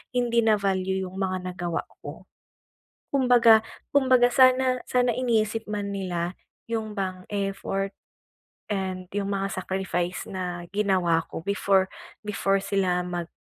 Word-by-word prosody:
hindi 240 -1 +2
na-value 190 -3 +1
yung 185 - -13
mga 185 -1 -1
nagawa 175 -2 -2 0.2
ko. - - -9 0.8
Kumbaga 240 -5 +6 0.3
kumbaga 255 -3 +5
sana 255 0 +4
sana 250 -1 +2
iniisip 225 -3 0
man 205 -1 -3
nila 180 -3 -2 0.4
yung 220 -2 -2
bang 185 -1 -3
effort, 195 -1 -2 0.7
and 190 -2 -2
yung 200 -1 -1
mga 195 0 -1
sacrifice 180 -2 -2
na 180 -2 -5
ginawa 185 -5 +2
ko - - -6
before 195 -1 +2 0.4
before 200 -1 +1
sila 185 -3 +1
mag 175 -1 -4
195 Hz, 120 wpm, -26 LUFS, 185-225 Hz, 0.8 s, Kumbaga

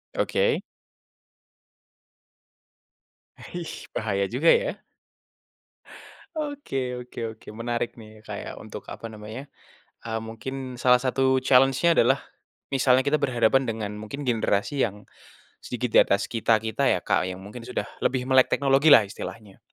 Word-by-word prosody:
Oke. 480 -1 +1 2.7
E - - -18
Hih, 175 -2 -6
bahaya 100 -3 0
juga 135 +8 0
ya. - - +3 1.6
Oke 275 - -3
oke 125 0 -9 0.2
oke, - - -23
menarik 120 +1 -3
nih, 110 -1 -13
Kak, - - -6
ya, - - -6
untuk - - -9
apa 115 - -7
namanya, 110 +5 -9 0.5
eee, 115 -1 -3
mungkin 130 +3 -6
salah 125 0 +5
satu 130 +1 +1
challenge-nya 135 +5 +4
adalah 135 -2 +4 0.5
misalnya 130 -1 +3
kita 140 +3 +1
berhadapan 130 -1 +2
dengan 110 -3 -3
mungkin 110 +7 -7
generasi 115 +2 0
yang 105 -2 -8 0.6
sedikit 125 0 -3
di - - +8
atas 100 - +1
kita-kita 110 +2 +1
ya, - - +2
Kak, - - +2
yang 90 - -6
mungkin 105 +5 -9
sudah 125 - -3 0.2
lebih 125 -1 0
melek 130 0 +4
teknologi 140 +2 +3
lah 130 -8 +8
istilahnya. 105 0 -9
125 Hz, 130 wpm, -25 LUFS, 110-135 Hz, 2.7 s, di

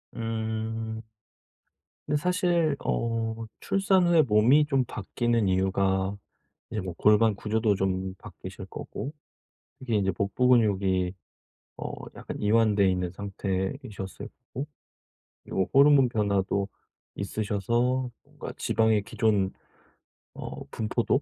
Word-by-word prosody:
음. 110 -1 -3 1.0
근데 150 - +1
사실 175 -2 +2
어 115 -1 0 0.2
출산 195 -2 +2
후에 170 -2 +6
몸이 125 +4 +5
좀 135 -2 +2
바뀌는 115 +1 0
이유가 95 +1 +1 0.6
이제 110 -3 -2
뭐 90 -2 -5
골반 105 0 +4
구조도 110 +1 +1
좀 95 0 -1
바뀌실 - - -9
거고 145 - -6 0.7
이게 125 -4 -2
이제 95 -1 +1
복부 100 +7 0
근육이 95 -6 +3 0.6
어 - - -5 0.2
약간 - - -7
이완돼 105 -2 +4
있는 90 -1 -1
상태이셨을 95 - -4 0.2
거고 135 +4 -3 0.8
그리고 95 - -1
호르몬 140 -1 +7
변화도 100 -3 0 0.5
있으셔서 115 +6 0
뭔가 - - -8
지방의 110 -2 +2
기존 100 -4 +1 0.8
어 - - -7
분포도 115 +4 0
110 Hz, 230 characters per minute, -27 LUFS, 95-125 Hz, 1.0 s, 호르몬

